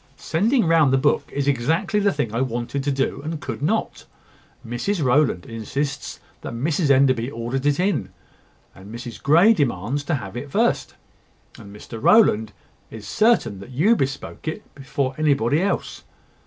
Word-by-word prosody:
"Sending 220 - +1
round 160 -4 +4
the 135 - +4
book 145 +2 +1
is 140 0 -2
exactly 155 - +1
the 200 -1 +2
thing 145 - -3
I 115 - 0
wanted 125 +2 -3
to 145 - +1
do, 135 0 -1
and 155 +1 -5
could - - -6
not. - - -1 0.6
Mrs 150 - -2
Rowland 125 - +2
insists 135 +6 -4 0.2
that - - -6
Mrs 145 +5 0
Enderby 130 -3 +3
ordered 130 +3 -3
it 145 +1 +1
in; 180 - 0 0.6
and 95 +2 -13
Mrs 120 0 -8
Grey 170 +10 +5
demands 135 - -1
to 150 - 0
have 100 -5 -7
it 140 +4 -6
first; - - 0 0.6
and 100 - -12
Mr 110 +1 -9
Rowland 110 - +4 0.4
is 110 -2 -10
certain 215 - +2
that 100 - -11
you 165 - +3
bespoke 135 -1 -4
it 155 - -6
before 140 -1 -3
anybody 145 -1 +2
else. 195 +1 -2
140 Hz, 160 wpm, -22 LUFS, 120-160 Hz, 0.6 s, Grey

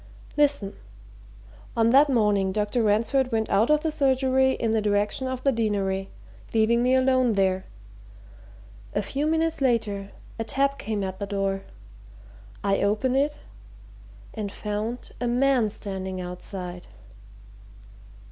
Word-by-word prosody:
Listen! 285 -9 +2 1.0
on 230 0 +4
that 280 +3 +6
morning, 210 -6 +2
Dr. 210 +4 0
Ransford 230 +5 +2
went 220 -1 -1
out 210 +6 +3
of 300 0 +4
the 320 - 0
surgery 265 -2 +2
in 225 - -1
the 220 -1 +2
direction 210 +5 0
of 260 -1 -4
the 275 - +4
Deanery, 200 -4 -1 0.5
leaving 225 +2 +3
me 250 +1 +3
alone 255 -2 +3
there. 190 -1 +1 1.3
A 205 - +1
few 280 +8 -2
minutes 320 -1 0
later, 215 -6 0 0.3
a - - 0
tap 275 +5 0
came 210 -1 -2
at 190 -1 -5
the 200 - -3
door. 195 -1 -1 1.0
I 195 0 +1
opened 215 +6 +1
it 290 +2 +1 1.0
and 205 -2 -4
found 210 +4 -4
a 245 - 0
man 250 -2 +2
standing 190 -2 -5
outside!" 180 0 -6
220 Hz, 130 wpm, -25 LUFS, 200-260 Hz, 1.3 s, that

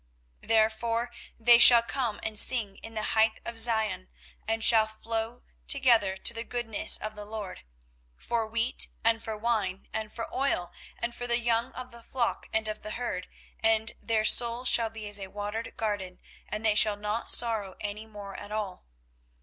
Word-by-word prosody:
24:031:012 - - -18
Therefore 230 +2 +1 0.3
they 235 +1 +6
shall 240 -1 +8
come 235 -4 -3
and 215 -1 -1
sing 220 -6 +2
in 225 0 -11
the 215 - -3
height 220 0 +2
of 235 -1 -2
Zion, 220 - +2 0.4
and 225 0 -1
shall 220 -1 +5
flow 225 +2 -5 0.2
together 235 -8 +4
to 235 - +2
the 230 0 -4
goodness 235 -3 +2
of 215 0 -5
the 210 -1 -8
LORD, 210 -2 -7 0.6
for 230 -2 -2
wheat, 230 +3 0 0.2
and 225 0 +2
for 220 -1 -6
wine, 210 -4 -2
and 215 -1 -4
for 230 - -6
oil, 220 -10 -1 0.3
and 235 0 -4
for 245 +1 -6
the 235 0 +2
young 235 0 0
of 255 0 -9
the 235 0 -13
flock 235 0 -3
and 220 0 0
of 215 0 -5
the 215 - -7
herd: 235 -7 -4 0.3
and 220 0 +2
their 220 -1 0
soul 235 +2 +3
shall 230 -2 +3
be 220 -1 -8
as 205 0 +2
a 195 - -6
watered 210 +3 -6
garden; 205 -4 -4 0.3
and 215 +1 -4
they 215 - +4
shall 210 -1 +4
not 210 +2 -2
sorrow 220 -5 +4
any 210 +1 -6
more 205 -2 -10
at 205 - -9
all. 205 - -5
220 Hz, 180 wpm, -28 LUFS, 210-235 Hz, 0.6 s, shall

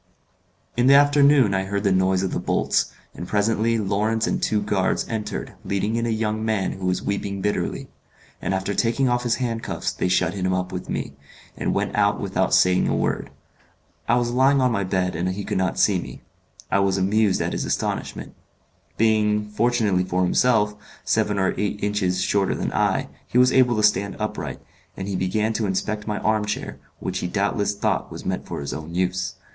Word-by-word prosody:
In 120 +1 +2
the 140 - +8
afternoon 140 -5 +5
I 95 0 0
heard 100 +1 -2
the 100 - +2
noise 95 0 +2
of 95 - -1
the - - -1
bolts, - - 0 0.2
and 85 - -7
presently 110 +3 +1
Lawrence 110 +2 0
and - - -1
two 105 - +1
guards 100 -2 0
entered 105 -2 -4
leading 100 +3 -1
in 115 0 0
a - - -1
young 110 -1 -1
man 110 -4 0
who 95 -1 -4
was 90 - 0
weeping 100 -1 -2
bitterly; 105 +2 -2 0.5
and 95 - -1
after 95 +2 -2
taking 120 +6 +1
off 120 0 +1
his 120 -1 +1
handcuffs 115 -3 -3
they - - -2
shut 90 0 +1
him 95 -2 -1
up 90 0 -2
with 90 -1 -6
me, 70 - -3 0.4
and - - -2
went - - -1
out - - +2
without - - -1
saying 90 0 +4
a - - +1
word. - - -1 0.8
I 120 - +4
was 120 -1 +1
lying 135 +3 +4
on 130 -1 +3
my 100 -3 0
bed, 90 -1 -1
and 90 +3 -1
he 100 +2 -4
could - - -1
not 95 0 0
see 100 -4 +3
me. - - -10 0.5
I 100 - +3
was 100 -1 +2
amused 100 +1 +2
at - - -1
his - - -2
astonishment. - - -3 0.6
Being, 105 -1 +2
fortunately 105 -4 +1
for 90 0 0
himself, 105 +2 +2 0.3
seven 105 -2 +1
or 95 -1 +1
eight 105 0 -2
inches 95 -3 0
shorter 95 0 +1
than - - -3
I, - - +1 0.2
he - - -1
was 125 +1 +6
able 125 -2 +4
to 105 - 0
stand 100 -1 +2
upright, 105 0 -4 0.4
and 95 - -5
he 100 - -2
began 105 +4 0
to 110 -1 -1
inspect 105 +3 -2
my 105 -1 -1
arm 110 0 +1
chair, 105 - -4 0.2
which 95 0 -3
he 90 - -2
doubtless 100 +1 0
thought 100 - -1
was - - -8
meant - - -3
for - - -5
his 70 - -4
own 80 +2 -7
use. 95 +1 -1
105 Hz, 200 wpm, -23 LUFS, 95-110 Hz, 0.8 s, the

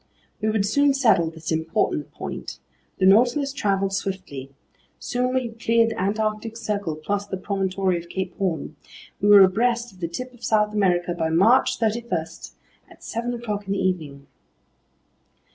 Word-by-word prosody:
We 215 - +1
would 215 -2 +1
soon 285 +6 +3
settle 220 -11 +3
this 160 0 -7
important 160 -2 -1
point. - - -7 0.4
The 185 - +2
Nautilus 245 +8 +4
traveled 195 -6 0
swiftly. 185 -9 -4 0.5
Soon 250 +1 -1
we 260 - +2
had 230 -1 -9
cleared 230 0 +3
the 225 - -4
Antarctic 215 +3 -1
Circle 200 -8 -2
plus 200 +6 -3
the 190 - -4
promontory 190 -2 -1
of 170 - -16
Cape 185 -1 -4
Horn. 165 -5 -2 0.5
We 205 - +2
were 205 -1 +10
abreast 235 +5 +1
of 185 - -19
the 170 - -2
tip 255 +10 -6
of 245 -1 -18
South 210 -2 +2
America 180 -4 +1
by 165 -2 -1
March 205 +11 +4
31 230 -3 0 0.7
at - - -18
seven 240 +2 -3
o'clock 210 -4 -4
in 195 - 0
the - - -1
evening. 155 -7 -2
200 Hz, 160 wpm, -23 LUFS, 180-230 Hz, 0.7 s, were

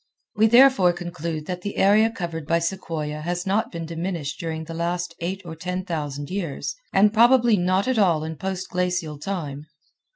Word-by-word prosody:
We 220 +1 +5
therefore 235 -6 +6
conclude 170 -3 -5
that 180 +1 -4
the 205 +2 -5
area 210 +3 +5
covered 170 -7 -5
by 165 - +3
sequoia 165 -4 -3
has 175 +2 -3
not 215 +5 0
been 165 -1 -5
diminished 165 -4 -4
during 160 -1 -4
the 165 - -8
last 175 +2 -2
eight 190 +3 -4
or 165 -1 -7
ten 180 +2 -4
thousand 145 -4 -4
years, 180 -7 -3 0.2
and 205 +2 +4
probably 240 0 +5
not 185 +3 +1
at 260 -3 +1
all 170 -6 +3
in 160 0 -5
post 190 +1 -4
glacial 180 -4 -2
time. 150 -4 -5
175 Hz, 175 wpm, -24 LUFS, 160-195 Hz, 0.2 s, therefore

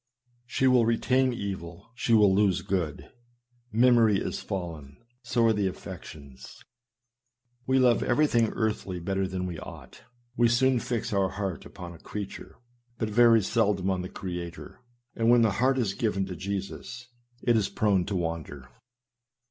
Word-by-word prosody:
She 130 - 0
will 125 -2 +5
retain 130 +3 +2
evil, 95 -3 -6
she 120 -1 +1
will 105 -3 +5
lose 100 -2 +2
good. 85 -6 -3 0.6
Memory 115 -2 +4
is - - -3
fallen. 80 -7 -6 0.2
So 120 -1 +1
are 115 - +4
the 100 -2 0
affections. 70 -7 -10 1.0
We 130 0 +3
love 125 -2 +4
everything 120 -3 +2
earthly 105 -5 -2
better 95 +2 -1
than 95 0 -4
we 85 -3 -5
ought; - - -11 0.3
we 120 -1 +4
soon 125 +2 +3
fix 115 -1 -3
our 95 -1 +2
heart 95 -3 -4
upon 85 -1 -9
a 85 - -14
creature, 100 -2 -7 0.4
but 110 -1 -2
very 115 -1 +5
seldom 100 -3 +1
on 95 -1 -1
the 90 - -6
Creator; 90 0 -7 0.4
and 115 0 +1
when 120 -1 +6
the 110 - +3
heart 130 +1 +3
is 110 -7 0
given 105 -5 -1
to 95 -1 -6
Jesus, 100 +6 -5 0.4
it 120 - +3
is 110 -3 +1
prone 100 -4 +1
to 100 - -3
wander. 80 -7 -4
100 Hz, 155 wpm, -27 LUFS, 90-120 Hz, 1.0 s, when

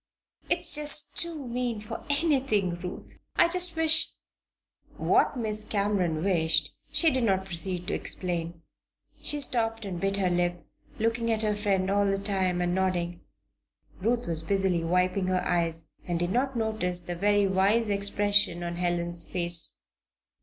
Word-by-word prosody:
"It's 345 -1 +1
just 295 0 +1
too 330 -5 -1
mean 240 -2 -2
for 215 +2 -7
anything, 265 - +1
Ruth! 180 0 -7 0.2
I - - +6
just 360 0 -1
wish 320 0 +4 0.5
" - - -55
What - - +3
Miss 215 -2 -2
Cameron 195 -7 0
wished 160 -5 +1 0.2
she 325 -2 +3
did 260 -2 0
not 190 -3 +2
proceed 180 0 -2
to 205 - -3
explain. 170 -2 -3 0.6
She 295 - -1
stopped 225 -5 0
and 180 -3 -5
bit 195 0 0
her 185 -2 +1
lip, 175 0 0 0.3
looking 230 +1 0
at 220 0 0
her 210 -1 +1
friend 195 -2 0
all 200 0 +3
the 195 0 +1
time 190 -3 0
and 175 0 0
nodding. 175 -2 -1 0.8
Ruth 235 +4 +1
was 165 -2 -2
busily 185 0 +1
wiping 180 +2 +1
her 185 -1 0
eyes 165 -2 -1 0.2
and 175 -1 0
did 175 +1 -1
not 260 +3 0
notice 215 -6 -1
the 175 0 -5
very 205 +2 +3
wise 195 +4 +2
expression 200 -3 +2
on 170 0 -4
Helen's 175 -1 -2
face. 170 -3 0
195 Hz, 155 wpm, -28 LUFS, 175-225 Hz, 0.8 s, I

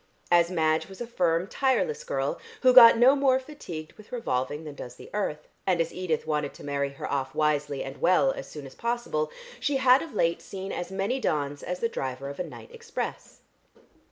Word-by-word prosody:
As 170 -1 +5
Madge 160 -3 +1
was 190 - -11
a 240 - -3
firm, 175 -6 +1
tireless 365 - 0
girl, - - -2 0.2
who 255 -1 +7
got 235 -2 +10
no 255 +4 +6
more 270 -2 +3
fatigued 220 - -8
with 215 - -17
revolving 145 - -2
than 150 -2 -7
does 125 -3 -9
the - - -13
earth, 150 -8 -2 0.2
and 180 -3 +2
as 165 0 0
Edith 180 -4 -2
wanted 150 -2 -1
to - - -12
marry 140 -1 -1
her - - -7
off 135 0 -2
wisely 150 -2 0
and 135 +1 -8
well 170 -6 +4
as 135 - -7
soon 150 -2 -8
as 135 - -11
possible, 235 -11 -2 0.3
she 285 -2 +1
had 260 0 +5
of 320 -8 -8
late 170 -3 +1
seen 195 0 -6
as 175 - -4
many 195 +7 -1
dawns 145 - -1
as 180 0 -4
the 230 - +2
driver 135 - -4
of 140 - -8
a - - 0
night 170 - -11
express. 465 -1 -6
175 Hz, 205 wpm, -27 LUFS, 150-240 Hz, 0.3 s, got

